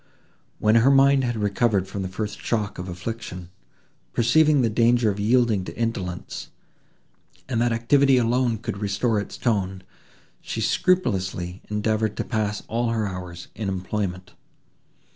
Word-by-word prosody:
When 110 0 +3
her 120 +4 +5
mind 140 0 +5
had 120 -1 -1
recovered 105 -2 +1
from 100 +1 -5
the 95 - -2
first 105 +2 -5
shock 105 -4 -2
of 90 +1 -5
affliction, 90 -1 -6 0.6
perceiving 145 +4 +4
the 115 - +2
danger 115 0 +3
of 100 - -6
yielding 110 -2 +2
to - - -8
indolence, 95 -6 -4 1.0
and 120 -3 0
that 120 0 +2
activity 130 +4 +4
alone 120 0 +2
could 115 -2 -5
restore 105 +2 0
its 100 - -6
tone, 95 -5 -1 0.6
she - - -5
scrupulously 95 - 0
endeavoured 110 0 0
to - - -1
pass 105 -3 -2
all 120 +1 0
her 110 -2 0
hours 90 -3 -7
in 105 -1 -3
employment. 95 -1 -3
110 Hz, 145 wpm, -24 LUFS, 95-120 Hz, 1.0 s, her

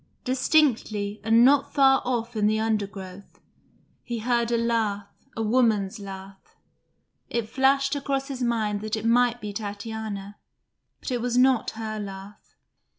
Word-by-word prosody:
Distinctly, 250 -6 +1
and 225 +2 +5
not 280 +1 +3
far 270 -1 +5
off 240 -1 -2
in 210 -1 +2
the 215 +1 +1
undergrowth, 200 -3 -4 0.6
he 240 - -5
heard 235 +1 0
a 235 - +2
laugh, 220 -4 0 0.3
a 225 - -1
woman's 215 -4 +1
laugh. 195 -1 -10 0.7
It 235 -2 -2
flashed 275 +3 +2
across 275 -1 -2
his 265 -2 -6
mind 220 -4 0
that 215 0 -2
it 220 0 -5
might 240 +1 +3
be 210 -3 -6
Tatiana, 205 -1 -6 0.6
but - - -5
it 245 -2 -1
was 245 0 -1
not 255 -2 +4
her 215 -1 -4
laugh. 195 0 -10
225 Hz, 145 wpm, -25 LUFS, 205-245 Hz, 0.7 s, and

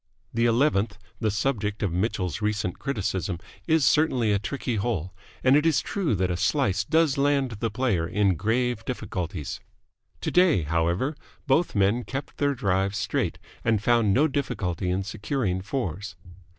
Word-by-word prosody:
The 115 +1 +2
eleventh, 115 -4 +2 0.2
the 110 - +1
subject 105 -1 -1
of 95 -5 0
Mitchell's 95 -1 -1
recent 105 -4 -1
criticism, 100 -8 -2 0.3
is 160 -4 +4
certainly 130 -8 +3
a 100 - +2
tricky 125 +1 -3
hole, 95 -5 -2 0.3
and 130 +1 +6
it 150 - +4
is 165 -2 +3
true 180 - -1
that 90 -1 0
a 85 - -1
slice 95 0 +1
does 155 +3 +2
land 140 -2 +2
the 115 - 0
player 105 -8 0
in 100 +2 +2
grave 110 +5 0
difficulties. 90 - -4 0.6
Today, 175 - +3
however, 85 - 0 0.3
both 145 +3 +2
men 100 +5 +2
kept 135 +3 -6
their 145 -1 +1
drives 95 -2 0
straight, 105 -1 -1 0.3
and 110 -2 +1
found 115 -3 +3
no 145 +10 +4
difficulty 95 - -2
in 95 +2 0
securing 100 -1 -2
fours. 100 - -4
105 Hz, 150 wpm, -26 LUFS, 95-135 Hz, 0.6 s, and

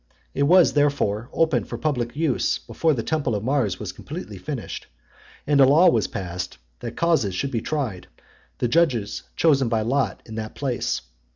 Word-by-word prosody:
It 140 - -2
was 180 0 +6
therefore 140 -6 +1
opened 160 -7 +1
for 120 - -5
public 120 -3 -2
use 155 -4 +1
before 145 +6 0
the 115 - -2
temple 150 -4 0
of 100 - -3
Mars 120 -7 0
was - - -4
completely - - -8
finished; - - -6 0.6
and 145 -1 +4
a - - +9
law 160 +7 +6
was 115 -4 +1
passed, 90 -1 -5 0.2
that - - -7
causes 160 - +2
should 135 +8 -2
be 115 -4 -1
tried, 130 -12 -3 0.5
and 120 - 0
judges 130 -12 +2
chosen 140 -7 +3
by 115 -2 +1
lot, 130 +5 0
in 110 - -10
that 110 -1 -5
place. 130 - -2
130 Hz, 175 wpm, -24 LUFS, 110-150 Hz, 0.6 s, a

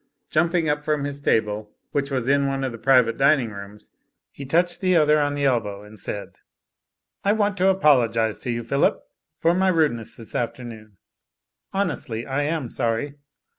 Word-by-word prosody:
Jumping 170 +1 +2
up 150 0 0
from 150 -1 0
his 140 0 -4
table, 105 -4 0 0.2
which 140 -1 -1
was 130 -3 -2
in 140 0 +3
one 135 0 -2
of 130 - -1
the 115 - -9
private 125 -2 +4
dining 135 -4 +3
rooms, 100 +1 -11 0.4
he 140 - -9
touched 175 +5 +1
the 185 -1 +2
other 150 -1 +4
on 145 0 0
the 145 -1 -1
elbow 105 -6 0
and 105 0 -12
said: 100 +2 -6 0.8
'*I 200 - +3
want 205 -2 +1
to 185 +1 +3
apologise 120 - +3
to - - -6
you, 120 0 -2
Phillip, 140 +5 +1 0.3
for 165 +1 +2
my 190 +2 +2
rudeness 150 - +1
this 115 - -11
afternoon. 115 -4 -5 0.7
Honestly, 160 - -2
I 135 +2 -1
am 150 -6 -2
sorry. 120 +4 -1
135 Hz, 170 wpm, -23 LUFS, 115-155 Hz, 0.8 s, private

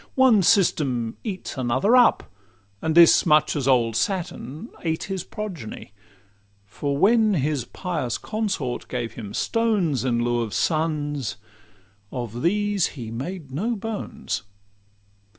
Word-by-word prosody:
One 260 -6 +5
system 140 - +2
eats 190 - -5
another 130 - +2
up, 245 -1 +5 0.6
and 160 0 -1
this 170 -1 +7
Much 155 -2 +3
as 140 -3 -1
old 120 -4 +3
Saturn 175 - -3
ate 160 -1 -2
his 190 -2 -4
progeny; 185 - -7 0.7
For 140 +7 -3
when 215 +3 +4
his 145 -4 0
pious 155 -10 -3
consort 195 - -3
gave 120 -2 -4
him 105 -4 -8
stones 200 - +1
In 120 -2 +1
lieu 120 0 +1
of 110 -3 -4
sons, 150 -5 -1 0.7
of 120 -2 -5
these 205 +2 +1
he 115 -3 -6
made 140 +5 -6
no 215 - -1
bones. 210 - -4
155 Hz, 125 wpm, -24 LUFS, 125-200 Hz, 0.7 s, this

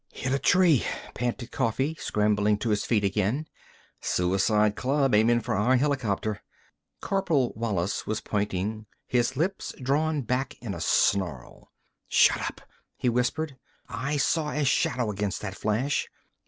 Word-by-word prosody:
"Hit 130 +1 -3
a 135 - +1
tree," 170 -2 +4 0.3
panted 120 0 -3
Coffee, 130 +5 0
scrambling 105 0 +1
to 110 +2 -2
his 105 -1 0
feet 110 -4 +1
again. 105 +9 0 0.6
"Suicide 100 +4 +2
club, 135 0 +1
aimin' 115 +3 +4
for - - -2
our 105 +7 +3
helicopter." 120 -7 0 0.6
Corporal 165 -10 +1
Wallis 105 -5 -2
was 110 0 -1
pointing, 105 +1 -2 0.2
his 125 +1 0
lips 185 +6 -2
drawn 145 +3 0
back 125 +3 -2
in 110 -5 -5
a 85 - -6
snarl. 85 -7 0 0.4
"Shut - - +4
up!" - - -5 0.4
he 125 - +1
whispered. 130 +4 -1 0.3
"I 130 +5 -2
saw 150 +2 +1
a 150 -1 -1
shadow 125 -3 +1
against 100 -1 -2
that 95 -2 -4
flash! 110 +8 -1
120 Hz, 140 wpm, -27 LUFS, 105-135 Hz, 0.6 s, tree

